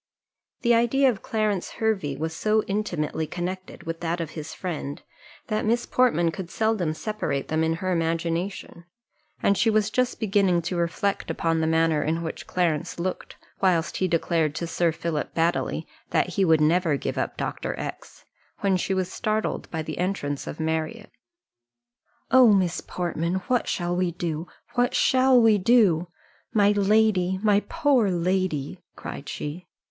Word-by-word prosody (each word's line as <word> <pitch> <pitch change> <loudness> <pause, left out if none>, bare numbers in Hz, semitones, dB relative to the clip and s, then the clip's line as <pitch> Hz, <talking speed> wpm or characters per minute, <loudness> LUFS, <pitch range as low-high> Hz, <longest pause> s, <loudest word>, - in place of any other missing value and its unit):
The 240 -1 +4
idea 250 +3 +4
of 205 - -8
Clarence 215 -4 -1
Hervey 195 -11 -1
was 160 +2 -3
so 215 +3 +2
intimately 175 -7 -2
connected 185 +2 -5
with 165 0 -5
that 170 +1 -2
of 165 -2 -4
his 155 -1 -7
friend, 155 -6 -5 0.5
that 215 -1 -1
Miss 235 +2 +1
Portman 175 -10 +2
could 175 +2 -7
seldom 215 -8 0
separate 155 -10 -3
them 160 +1 +1
in 160 0 +1
her 185 +2 -2
imagination; 170 +1 -2 0.6
and 200 - +4
she 225 - +3
was 215 -1 +2
just 250 +1 0
beginning 195 -5 +2
to 180 +2 -3
reflect 175 +4 -1
upon 165 -1 0
the 160 - +1
manner 160 -1 +2
in 165 +2 -1
which 160 - -6
Clarence 165 -4 -1
looked, 185 +2 -4 0.3
whilst 175 -4 +2
he 185 - +1
declared 165 -3 +1
to 170 - -2
Sir 170 0 +1
Philip 165 -1 -3
Baddely, 165 +1 0 0.2
that - - +1
he 200 - 0
would 160 -2 +4
never 160 -1 +3
give - - -3
up - - -3
Dr. - - -3
X, - - -7 0.4
when 195 -2 +2
she 190 +1 -1
was 185 -1 -2
startled 215 0 -2
by 160 -1 -3
the 155 +1 -6
entrance 175 -7 -2
of - - -6
Marriott. 160 +8 -2 1.2
"Oh, 255 -3 +7
Miss 185 -4 +2
Portman, 170 0 -2
what 250 -2 +1
shall 175 0 -1
we 180 0 +1
do? 165 -1 -3 0.3
what 245 0 +1
shall 260 -1 +5
we 225 -3 +5
do? 185 -6 +4 0.5
My 205 -1 +5
lady! 205 -2 +3
my 205 -2 +5
poor 285 -10 +3
lady!" 180 -5 -1 0.2
cried - - -7
she. 170 +5 -6
180 Hz, 160 wpm, -25 LUFS, 165-215 Hz, 1.2 s, Oh